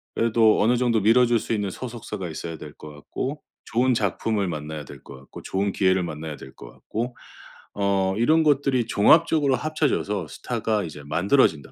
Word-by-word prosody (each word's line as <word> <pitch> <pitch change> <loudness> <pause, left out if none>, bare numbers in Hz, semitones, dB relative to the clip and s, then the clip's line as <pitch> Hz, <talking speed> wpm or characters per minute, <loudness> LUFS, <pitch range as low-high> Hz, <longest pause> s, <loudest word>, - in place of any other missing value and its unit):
그래도 115 -2 +3
어느 120 +4 +3
정도 120 -3 +2
밀어줄 120 +2 +4
수 115 - -3
있는 105 -2 -1
소속사가 115 -7 -6
있어야 80 +1 -6
될 75 -1 -10
것 75 - -11
같고 130 - -5 0.2
좋은 125 +2 +1
작품을 105 -1 -1
만나야 75 -2 -5
될 70 -2 -12
것 70 - -11
같고 65 - -12
좋은 100 +1 -1
기회를 95 -1 +2
만나야 80 -2 -6
될 65 - -12
것 - - -12
같고 120 +3 -5 0.6
어. 100 -1 +1
'이런 160 +7 +3
것들이 135 -5 +2
종합적으로 145 +5 +4
합쳐져서 125 - -1
스타가 110 -3 -2
이제 75 -2 -9
만들어진다.' 85 - +1
105 Hz, 375 characters per minute, -24 LUFS, 85-125 Hz, 0.6 s, 밀어줄